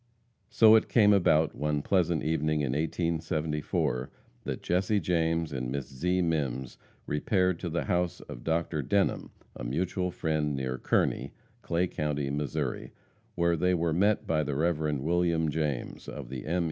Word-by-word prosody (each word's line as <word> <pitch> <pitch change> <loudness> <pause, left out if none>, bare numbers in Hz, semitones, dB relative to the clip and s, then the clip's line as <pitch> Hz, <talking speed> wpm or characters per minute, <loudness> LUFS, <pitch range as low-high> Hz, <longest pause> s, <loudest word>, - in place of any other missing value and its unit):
So 110 -1 +6
it 110 - +4
came 105 -3 +5
about 80 -5 +3
one 75 -1 -1
pleasant 85 -4 +1
evening 75 -1 0
in 70 -3 0
1874, 75 -3 -1 0.4
that - - -4
Jesse 95 +4 +1
James 80 -2 0
and 65 -2 -3
Miss 70 -1 -3
Zee 90 +7 0
Mimms 70 -6 -2 0.3
repaired 90 +3 +1
to 85 - -4
the 85 +1 -1
house 90 -1 0
of - - -10
Dr. 80 -1 0
Denham, 100 +9 0 0.3
a - - -7
mutual 90 +8 -1
friend, 75 -4 -1
near 65 -1 -3
Kearney, - - 0 0.3
Clay 85 +2 0
county, 75 -4 -2
Missouri, 70 -1 -3 0.4
where 85 0 +2
they 90 +2 +2
were 85 -1 0
met 100 +5 +2
by 80 -1 +1
the 70 -1 -3
Rev. 80 +2 +1 0.2
William 85 0 +1
James, 75 -4 -3
of - - -7
the 65 0 -6
M. 85 +3 0
80 Hz, 155 wpm, -29 LUFS, 75-90 Hz, 0.4 s, So